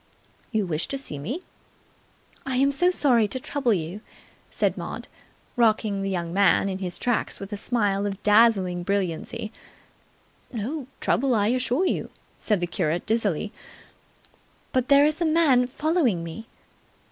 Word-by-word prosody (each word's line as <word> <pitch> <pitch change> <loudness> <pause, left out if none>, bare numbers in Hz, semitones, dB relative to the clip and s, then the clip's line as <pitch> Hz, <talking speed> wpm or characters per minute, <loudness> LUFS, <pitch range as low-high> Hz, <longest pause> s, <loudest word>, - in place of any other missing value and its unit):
"You 215 -4 +1
wished 160 -2 -2
to 275 - -2
see 155 - -5
me?" 255 - -4 1.0
"I 265 -1 -3
am 275 +2 +3
so 355 +6 +3
sorry 250 -11 +3
to 260 - -2
trouble 260 -1 -1
you," 180 +1 -2 0.5
said - - 0
Maud, - - -6 0.5
rocking 215 -4 +2
the 195 - -2
young 170 -3 -3
man 200 0 +4
in 190 0 -4
his 180 -2 -4
tracks 245 -2 -1
with 200 +1 -7
a - - -1
smile 205 -2 0
of 195 0 -6
dazzling 205 -5 +4
brilliancy 195 +2 -2 1.0
("No 255 +4 -4
trouble, 265 -1 +2
I 210 0 +2
assure 255 +7 +1
you," - - -1 0.3
said 210 -4 +1
the - - +1
curate 170 -1 -1
dizzily) 215 -3 0 1.2
"but 255 -1 +1
there 280 0 +6
is 310 +3 0
a - - +3
man 310 -6 +4
following 270 - 0
me!" 190 +8 -8
220 Hz, 150 wpm, -25 LUFS, 195-260 Hz, 1.2 s, there